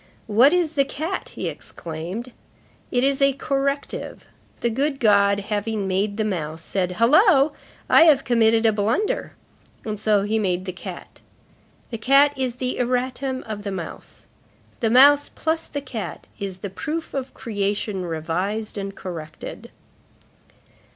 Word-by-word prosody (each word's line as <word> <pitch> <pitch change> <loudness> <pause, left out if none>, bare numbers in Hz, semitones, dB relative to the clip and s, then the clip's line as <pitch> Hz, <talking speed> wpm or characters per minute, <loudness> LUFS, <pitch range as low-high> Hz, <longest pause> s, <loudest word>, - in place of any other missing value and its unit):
"What 235 +6 +5
is 345 -3 +1
the 280 -3 +3
cat?" 310 +7 -4
he - - -3
exclaimed. 175 +10 -6 0.6
"It 245 0 +1
is 275 0 +1
a 275 0 +5
corrective. 275 +1 -3 0.4
The 235 - +1
good 275 +4 -1
God, 200 -2 +4
having 210 0 -2
made 200 +2 0
the 220 - +1
mouse, 160 -5 -3
said: 180 -1 -1
'Hullo! 290 - +5 0.4
I 325 - +7
have 290 -4 +5
committed 230 -2 +3
a 220 - +6
blunder.' 220 - 0 0.5
And 215 -2 -4
so 210 -2 +2
he 220 +2 0
made 185 -3 -1
the 185 - -3
cat. 180 - -9 0.7
The 230 - -4
cat 275 +5 +5
is 260 -3 -2
the 255 0 -3
erratum 255 +1 -1
of 215 -2 -6
the 205 - -4
mouse. 185 -4 -8 0.5
The 225 - +1
mouse, 285 +4 +6
plus 320 +1 -2
the 285 - -4
cat, 250 -6 -6
is 195 -3 -5
the 195 - -5
proof 315 +10 -4
of 265 -1 -4
creation 205 -3 -2
revised 180 +7 -3
and 195 0 -5
corrected." 160 -4 -8
225 Hz, 145 wpm, -23 LUFS, 200-275 Hz, 0.7 s, I